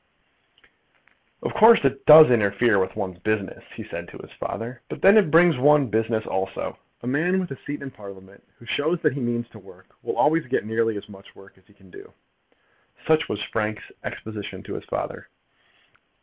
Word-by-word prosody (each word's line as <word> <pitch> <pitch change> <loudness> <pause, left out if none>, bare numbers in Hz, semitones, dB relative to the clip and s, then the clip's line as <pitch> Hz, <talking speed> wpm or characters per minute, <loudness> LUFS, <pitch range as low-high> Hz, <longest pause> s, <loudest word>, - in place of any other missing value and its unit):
"Of - - -3
course 225 -7 +6
it 135 0 -1
does 155 -3 +10
interfere 105 -1 +2
with 95 - -2
one's 95 -4 -5
business," 105 0 -3
he - - -7
had - - -16
said - - -6
to - - -12
his - - -13
father, 120 +3 -6
"but - - -8
then 195 +2 +7
it 210 -7 +4
brings 165 -3 +4
one 145 -1 +4
business 110 0 -1
also. 95 0 -4 0.2
A - - -7
man 165 +8 +1
with 180 -4 -5
a 135 - -6
seat 145 0 -6
in 135 - -7
Parliament 100 -2 -14
who 120 - -17
shows 155 +7 -1
that 150 - +2
he 140 - -5
means 120 -1 -3
work 100 -3 -16
will - - -4
always 160 -1 +2
get 125 - -1
nearly 110 0 -1
as 100 - -9
much 100 -1 -15
work 100 0 -17
as 95 - -31
he 105 - -23
can 95 -2 -21
do." - - -13 0.9
Such 160 +1 +2
was 105 - -3
Frank's 110 -1 -4
exposition 110 -2 -7
to - - -8
his - - -7
father. - - -5
120 Hz, 190 wpm, -23 LUFS, 100-150 Hz, 0.9 s, does